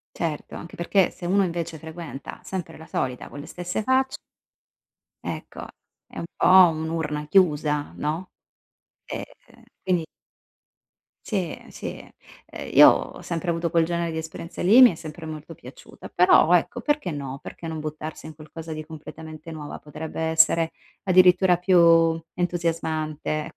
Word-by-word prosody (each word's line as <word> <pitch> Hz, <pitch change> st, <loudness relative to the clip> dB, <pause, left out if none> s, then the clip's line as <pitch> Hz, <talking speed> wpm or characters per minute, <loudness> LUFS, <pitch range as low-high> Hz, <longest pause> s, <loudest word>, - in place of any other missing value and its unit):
Certo, 160 Hz, -3 st, -4 dB
anche 170 Hz, -, -9 dB
perché, 180 Hz, +2 st, +2 dB
se 175 Hz, -, -11 dB
uno 195 Hz, +2 st, +3 dB
invece 170 Hz, -2 st, -4 dB
frequenta 160 Hz, -2 st, -8 dB
sempre 185 Hz, -3 st, -6 dB
la 160 Hz, -, -12 dB
solita 125 Hz, -1 st, -3 dB
con -, -, -10 dB
le 145 Hz, -, -8 dB
stesse 180 Hz, +4 st, -4 dB
facce 260 Hz, +1 st, +2 dB, 1.1 s
Ecco -, -, -6 dB, 0.4 s
è -, -, -12 dB
un -, -, -4 dB
po' -, -, +1 dB, 0.2 s
un'urna 155 Hz, -2 st, -3 dB
chiusa, 150 Hz, -5 st, +2 dB
no? 160 Hz, +5 st, -3 dB, 0.8 s
Ehm -, -, -10 dB, 0.2 s
quindi 175 Hz, -3 st, +1 dB, 1.2 s
Sì, 220 Hz, -, -5 dB, 0.2 s
ehm, -, -, -15 dB
sì, -, -, -7 dB, 0.4 s
ehm, -, -, -8 dB
io -, -, +10 dB
ho -, -, 0 dB
sempre 170 Hz, +1 st, -3 dB
avuto 170 Hz, 0 st, -1 dB
quel 165 Hz, -1 st, +3 dB
genere 170 Hz, 0 st, -1 dB
di 160 Hz, -, -5 dB
esperienza 160 Hz, +1 st, -6 dB
lì 195 Hz, +6 st, +5 dB
e -, -, +11 dB
mi 255 Hz, -, +10 dB
è -, -, -7 dB
sempre 160 Hz, +1 st, -9 dB
molto 155 Hz, +1 st, -8 dB
piaciuta. 130 Hz, -3 st, -13 dB
Però 175 Hz, -1 st, +5 dB
ecco 180 Hz, +8 st, +1 dB
perché 295 Hz, -, 0 dB
no, 140 Hz, -2 st, -5 dB
perché 165 Hz, -, -9 dB
non 160 Hz, -, -4 dB
buttarsi 155 Hz, +1 st, -6 dB
in 155 Hz, -, -9 dB
qualcosa 160 Hz, +1 st, -9 dB
di 155 Hz, 0 st, -5 dB
completamente 160 Hz, 0 st, -10 dB
nuova, 150 Hz, -2 st, -7 dB
potrebbe 155 Hz, +2 st, -7 dB
essere 160 Hz, 0 st, +3 dB, 0.3 s
addirittura 180 Hz, -1 st, +5 dB
più 165 Hz, -3 st, +5 dB
entusiasmante. 160 Hz, -3 st, -2 dB
165 Hz, 150 wpm, -24 LUFS, 155-175 Hz, 1.2 s, e